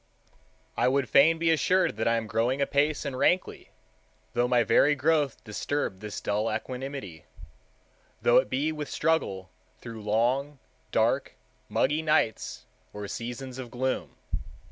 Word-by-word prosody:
I - - +2
would 135 0 +1
fain 155 +7 +6
be 165 0 +2
assured 180 - +2
that 110 - 0
I 115 - +3
am 115 - -2
growing 115 +5 0
apace 145 +2 +1
and 140 -2 -3
rankly, 180 +7 0 0.6
though 120 +1 +2
my 125 -1 +3
very 145 +6 +4
growth 145 -2 +1
disturb 110 -1 -3
this 105 0 -6
dull 105 +2 -1
equanimity—though 125 - -4
it - - +3
be 140 +6 0
with 150 -2 -5
struggle 100 - -1 0.3
through 115 -2 -9
long, 125 +7 0 0.3
dark, - - +1 0.3
muggy 150 +4 +1
nights 155 -8 0 0.3
or 105 0 -6
seasons 125 +4 -6
of 125 -2 -6
gloom. 130 +2 -2
130 Hz, 135 wpm, -27 LUFS, 115-145 Hz, 0.6 s, fain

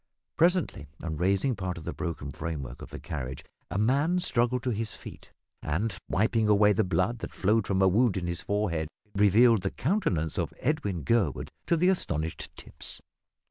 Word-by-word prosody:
Presently 170 - +2 0.2
on 80 -2 -3
raising 100 - +1
part 90 -3 -3
of 85 - -8
the - - -4
broken 80 -5 -4
framework 70 -7 -5
of - - -9
the - - -7
carriage 65 -3 -5 0.2
a - - -3
man 140 - +2
struggled 125 -8 +1
to 125 - 0
his 110 -1 -3
feet - - -12 0.3
and, 95 +7 -1
wiping 110 +2 +2
away 105 0 +5
the 110 - +2
blood 95 +6 0
that - - -7
flowed 110 +4 +2
from 95 -1 +2
a - - +6
wound 105 +2 +3
in 90 - -2
his 85 -1 -3
forehead, 95 -7 -1 0.3
revealed 105 +2 +5
the 95 - -1
countenance 120 - 0
of - - -2
Edwin 110 - -1
Gurwood 100 - +1 0.2
to 170 - +3
the 180 +3 +4
astonished 80 - -2
Tipps. - - -3
100 Hz, 180 wpm, -28 LUFS, 85-120 Hz, 0.3 s, a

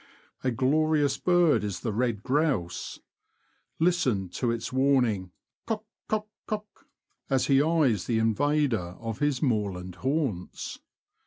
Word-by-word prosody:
A 130 - +2
glorious 145 +3 +2
bird 175 - +4
is 100 -3 -3
the 110 - -2
red 115 -2 0
grouse! 130 - -1 0.8
Listen 135 - +1
to 120 +7 -1
his 115 +1 -3
warning 125 -8 +2 0.2
'' - - -63
kok, 220 -1 -2 0.2
kok, 215 0 -1 0.2
kok," 210 -1 -6 0.4
as 135 -2 +2
he 135 -1 +4
eyes 145 - +2
the 115 - +1
invader 115 -4 +1
of 115 +1 -5
his 145 -2 +1
moorland 100 - -1
haunts. 130 - -2
130 Hz, 130 wpm, -27 LUFS, 105-150 Hz, 0.8 s, bird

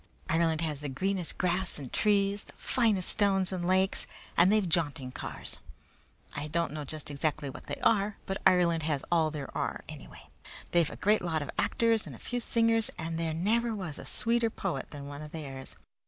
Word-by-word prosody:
Ireland 160 -1 +2
has 155 -4 -2
the 145 -1 -4
greenest 185 +5 -1
grass 180 0 0
and 140 -4 -8
trees, 200 -1 +2
the - - -15
finest 220 -7 +2
stones 195 -3 +2
and 175 -2 -2
lakes, 190 +1 +2 0.3
and 180 +3 +6
they've 210 -3 +3
jaunting 150 -6 0
cars. - - -5 0.8
I 145 +1 -3
don't 165 -1 -1
know 155 -1 -4
just 150 +1 -6
exactly 145 -1 -1
what - - -10
they - - -2
are, 210 -1 +3
but 195 - -3
Ireland 170 -3 +4
has 150 -3 -1
all 165 -2 +4
there 150 -3 -6
are, - - -2
anyway. 60 - -10 0.4
They've 170 -2 +4
a - - -8 0.3
lot 160 -3 0
of 140 - -8
great - - -8
actors, 230 -1 +2
and - - -7
a - - -11
few 245 - -3
singers, 230 -1 +2
and 165 0 -3
there 165 -1 -1
never 225 +6 +1
was 180 -8 -5
a - - -8
sweeter 230 0 +1
poet 135 -10 -3
than 145 -2 -8
one 145 +1 -7
of 150 -1 -8
theirs. 135 -4 -6
170 Hz, 195 wpm, -30 LUFS, 150-200 Hz, 0.8 s, and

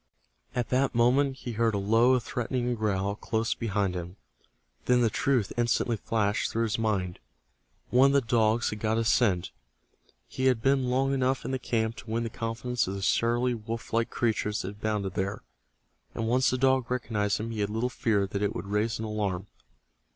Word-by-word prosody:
At 120 -2 -1
that 130 0 +1
moment 130 +4 +3
he 125 -2 -6
heard 115 -1 +1
a - - +1
low 115 +6 +4
threatening 125 +1 -2
growl 100 -3 -1
close 110 +1 -1
beside 100 -4 -1
him. 90 0 -6 0.7
Then 125 0 +4
the 115 -2 +2
truth 125 -7 +1
instantly 120 0 +1
flashed 105 -1 0
through 115 - 0
his 115 -1 -1
mind. 95 -5 -1 0.7
One 130 +2 +6
of 140 - +2
the 140 - +4
dogs 115 -1 +2
had 105 - -5
got 110 +1 0
his 115 0 +1
scent. 95 -8 +2 0.8
He 130 - -3
had 130 -3 +3
been 135 +1 +2
long 135 +2 +1
enough 130 0 0
in - - -3
the 130 - -1
camp 115 -2 -1
to 115 - -10
win 115 +1 -1
the 115 - -4
confidence 115 +1 -2
of 95 - -3
the 100 - -5
surly 120 +4 +2
wolf 115 0 -6
like 115 0 +1
creatures 110 -2 -1
that 95 - -3
abounded 105 -2 -2
there, 100 +2 -3 0.7
and 115 - -2
once 125 +3 +3
the 130 - 0
dog 130 -1 +2
recognized 110 -5 -1
him 115 +2 -4
he 110 - -5
had 100 -1 0
little 115 +3 -1
fear 105 -5 +1
that 100 +1 -4
it 105 - 0
would 85 - -4
raise 105 +3 0
an 110 - -4
alarm. 100 -4 -2
115 Hz, 195 wpm, -28 LUFS, 105-125 Hz, 0.8 s, One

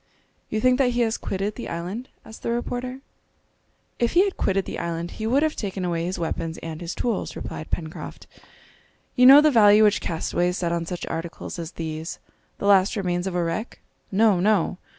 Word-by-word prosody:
"You 215 - -1
think 255 +3 +3
that 250 -2 +3
he 240 - +1
has 225 -1 +1
quitted 195 +2 -3
the 240 - -7
island?" 185 +9 -5 0.2
asked 220 - -12
the - - -3
reporter. 245 +2 -3 1.0
"If 235 - +1
he 355 +3 +6
had 400 -2 -1
quitted 195 0 0
the - - -5
island 170 0 -3
he 220 - -4
would 270 +6 +3
have 310 -1 0
taken 195 -3 -3
away 170 -1 -1
his 185 +2 -3
weapons 165 -1 -3
and 160 0 -6
his 170 +1 -5
tools," 235 -5 -2
replied 155 - -7
Pencroft. 160 -2 -6 0.9
"You 250 -1 +6
know 275 +3 +10
the 305 0 +4
value 210 -3 +6
which 210 -1 +3
castaways 175 +2 -1
set 170 -2 -1
on 170 -1 -2
such 175 0 -4
articles 165 +1 -6
as 165 +1 -6
these, 160 0 -5 0.4
the - - -5
last 200 +1 +4
remains 180 -2 -1
of 185 - -3
a 175 - +1
wreck? 170 +8 -3 0.3
No! 205 -1 +4
no!" 190 -2 +1
195 Hz, 195 wpm, -24 LUFS, 170-235 Hz, 1.0 s, know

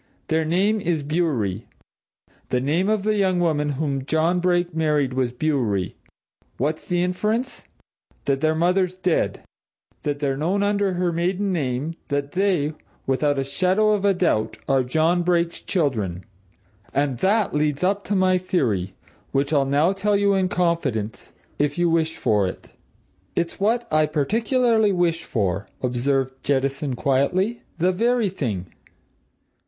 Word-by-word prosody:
Their 160 0 +1
name 200 +6 +1
is 170 -6 -1
Bewery. 140 - -1 0.8
The 125 - +1
name 160 +9 +1
of 215 -2 +1
the 215 +1 +2
young 190 -3 +2
woman 150 -4 +1
whom 140 -2 -2
John 160 +5 +1
Brake 175 -1 +1
married 150 -4 +1
was 130 -2 0
Bewery. 120 - -1 0.6
What's 150 +5 -1
the 175 -1 0
inference? 215 +8 -2 0.6
That 135 -1 0
their 155 0 +2
mother's 180 +2 +1
dead 180 -3 0 0.6
that 145 -1 -2
they're 140 -2 -1
known 185 +7 0
under 205 -1 +1
her 180 -1 0
maiden 185 +4 0
name: 140 0 -2
that 145 -1 -2
they, 180 -6 +1 0.3
without 145 +2 +1
a 135 - +1
shadow 185 +10 +2
of 200 -2 +2
doubt, 165 -12 +1
are 135 -1 +3
John 160 +7 +2
Brake's 170 -1 0
children. 110 - -1 0.7
And 140 -3 0
that 205 - +2
leads 150 +1 0
up 200 +2 +1
to 205 - -1
my 185 -1 +3
theory 110 - -1 0.4
which 140 +2 0
I'll 140 -2 +3
now 150 +7 +3
tell 200 +1 +1
you 200 0 +3
in 190 -1 +1
confidence 165 - -1 0.2
if 145 +1 0
you 175 -1 +2
wish 160 -1 +1
for 105 -5 +2
it." 90 - -8 0.7
"It's 170 0 -2
what 230 +4 +1
I 155 0 +4
particularly 220 - +2
wish 170 -3 0
for," 100 - -1 0.2
observed 130 +1 -1
Jettison 140 0 0
quietly. 180 - +1 0.2
"The 180 +3 +2
very 230 +2 +1
thing!" 105 - -4
160 Hz, 145 wpm, -23 LUFS, 135-185 Hz, 0.8 s, I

